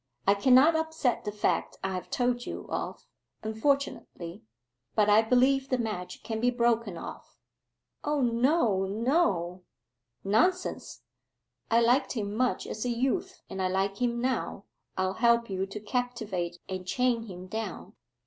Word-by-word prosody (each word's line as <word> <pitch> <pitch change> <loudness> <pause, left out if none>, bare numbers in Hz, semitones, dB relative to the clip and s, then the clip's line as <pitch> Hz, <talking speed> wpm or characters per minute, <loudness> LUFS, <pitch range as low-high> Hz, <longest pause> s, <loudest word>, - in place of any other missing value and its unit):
I 200 - +6
cannot 260 +9 +6
upset 320 -8 0
the 210 - -1
fact 210 0 0
I 190 0 -1
have 185 - -5
told 245 -1 0
you - - -5
of, - - -4 0.4
unfortunately. 220 -7 -2 0.5
But 210 -1 +4
I 210 +2 +7
believe 260 +4 +3
the 255 - +2
match 215 -7 -4
can 220 -1 -3
be 245 +2 +3
broken 230 -6 +1
off.' - - -9 0.7
'O 295 0 0
no, 235 - +2
no.' 195 - +1 0.6
'Nonsense. 360 - 0 0.7
I 230 +1 +4
liked 245 +4 +3
him 205 -4 -3
much 250 +3 0
as 215 - -4
a 250 - -1
youth, 270 +11 -1
and 190 - -5
I 185 - +2
like 195 +3 -1
him 240 -1 +1
now. 245 -5 -1 0.3
I'll 185 0 +1
help 235 -2 +4
you 190 0 -1
to 195 +2 -6
captivate 210 -6 -2
and 185 -1 -5
chain 240 0 +1
him 185 -2 -8
down. 220 +4 -5
230 Hz, 150 wpm, -29 LUFS, 195-250 Hz, 0.7 s, I